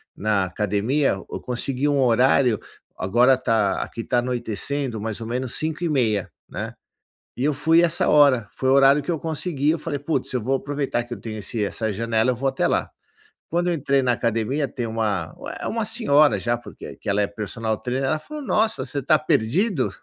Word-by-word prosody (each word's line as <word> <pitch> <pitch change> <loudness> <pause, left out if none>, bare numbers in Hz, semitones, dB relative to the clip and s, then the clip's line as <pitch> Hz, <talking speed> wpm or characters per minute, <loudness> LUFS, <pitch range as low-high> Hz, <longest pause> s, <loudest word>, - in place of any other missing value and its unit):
na 105 -2 +1
academia, 105 +9 0
eu 95 - -8
consegui 125 +3 -2
um 145 -1 +2
horário, 125 -1 +4 0.4
agora 120 +7 +4
está 115 -6 +1
aqui 115 - -7
está 120 +1 +1
anoitecendo 120 0 -2
mais 110 0 -4
ou 115 - -6
menos 125 +1 -2
17:30, 150 - 0 0.2
né. - - -5 0.6
E 125 - -3
eu 150 0 +2
fui 160 +4 +4
essa 170 -1 +2
hora, 140 -7 +5
foi 130 - -3
o - - +5
horário 140 +1 +6
que 175 - -2
eu 160 - -2
consegui, 155 -2 -1
eu 165 - 0
falei: 150 -2 -4
"Putz, 145 -2 -2
eu 125 - 0
vou 135 +4 0
aproveitar 140 -4 -2
que 120 - -7
eu 100 - -12
tenho 110 -1 -6
esse 105 +2 -3
essa 110 +2 -2
janela, 115 +3 0
eu - - -2
vou 135 +3 0
até - - 0
lá". - - 0 0.6
Quando 175 +2 0
eu 175 - +2
entrei 140 -2 +1
na 125 -2 +2
academia, 120 +5 -1
tem 120 -2 -4
uma 105 -7 -2 0.3
é - - -3
uma 225 -1 -1
senhora 150 - +3
já, 120 +3 0
porque 120 - -10
que - - -13
ela 100 +1 +2
é 100 - +1
personal 110 +2 -3
trainer, 130 +4 -2
ela 155 +4 +1
falou: 300 - -8
"Nossa, 215 - +1
você 140 +2 -5
está 155 +3 +3
perdido?", 145 - +1
130 Hz, 200 wpm, -23 LUFS, 110-145 Hz, 0.6 s, horário